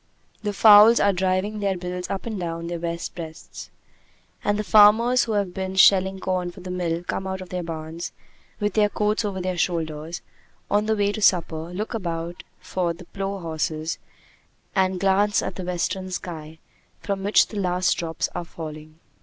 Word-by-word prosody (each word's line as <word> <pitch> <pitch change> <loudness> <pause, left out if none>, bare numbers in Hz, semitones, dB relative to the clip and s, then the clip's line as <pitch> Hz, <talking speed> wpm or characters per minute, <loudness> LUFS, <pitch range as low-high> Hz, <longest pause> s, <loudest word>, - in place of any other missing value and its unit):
The 210 -1 -1
fowls 210 +2 +8
are 200 0 +3
driving 190 +3 0
their 195 -2 0
bills 180 0 -5
up 195 - -4
and 220 -4 -4
down 165 -1 -4
their 170 0 -4
wet 170 0 -3
breasts. 160 -2 -9 0.7
And 205 0 +1
the 210 - -1
farmers 220 +4 +6
who 225 - -2
have 200 -3 0
been 190 0 -4
shelling 190 0 +5
corn 185 -1 -1
for 180 +1 -12
the 180 0 -6
mill 175 -2 -2
come 190 +2 -3
out 190 0 -3
of 185 -1 -9
their 180 -1 -3
barns, 165 0 -6 0.5
with 210 -1 0
their 210 -1 +3
coats 210 +2 0
over 200 -2 -3
their 185 -1 -2
shoulders, 160 -1 -2 0.5
on 210 +1 +2
the 220 - +2
way 205 -1 +1
to 215 - -5
supper, 165 -4 +2
look 210 +6 -4
about 170 -5 -4
for 175 -2 -2
the 175 +1 -13
plough 195 +2 -4
horses, 160 -2 -3 0.8
and 190 -1 +2
glance 200 +2 +2
at - - -3
the 185 - -6
western 180 +1 -2
sky, 160 -3 -6 0.4
from 195 -1 -3
which 205 +2 +5
the 210 - -4
last 180 -1 +1
drops 165 -1 -2
are 175 - -4
falling. 155 -1 -9
185 Hz, 180 wpm, -24 LUFS, 170-200 Hz, 0.8 s, fowls